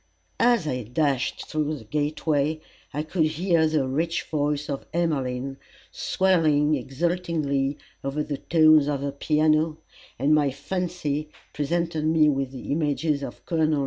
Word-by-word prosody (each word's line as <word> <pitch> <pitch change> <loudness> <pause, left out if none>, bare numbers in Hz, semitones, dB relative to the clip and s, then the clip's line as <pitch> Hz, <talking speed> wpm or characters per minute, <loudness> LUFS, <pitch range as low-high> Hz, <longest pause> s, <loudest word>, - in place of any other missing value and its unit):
As 235 -7 +4
I 125 -3 -1
dashed 130 +3 -1
through 155 0 -1
the 130 - -11
gateway, 150 +3 0 0.3
I 150 - -2
could 160 +1 +1
hear 160 +1 +2
the 155 -4 +1
rich 165 +5 -1
voice 150 -1 -1
of 140 -2 -5
Emmeline 135 -5 -1 0.3
swelling 155 -6 +2
exultingly 145 0 -1 0.2
with 145 +3 -3
the 145 - -1
tones 155 -3 +5
of 145 -2 -1
her 140 0 -2
piano, 155 +2 +2 0.4
and 140 +5 +3
my 150 -2 +4
fancy 150 0 -3 0.2
presented 160 +1 -1
me 155 -1 +4
with 135 -2 0
the 130 0 -7
images 145 -1 0
of - - -8
Col. 155 -3 +1
150 Hz, 140 wpm, -25 LUFS, 140-160 Hz, 0.4 s, tones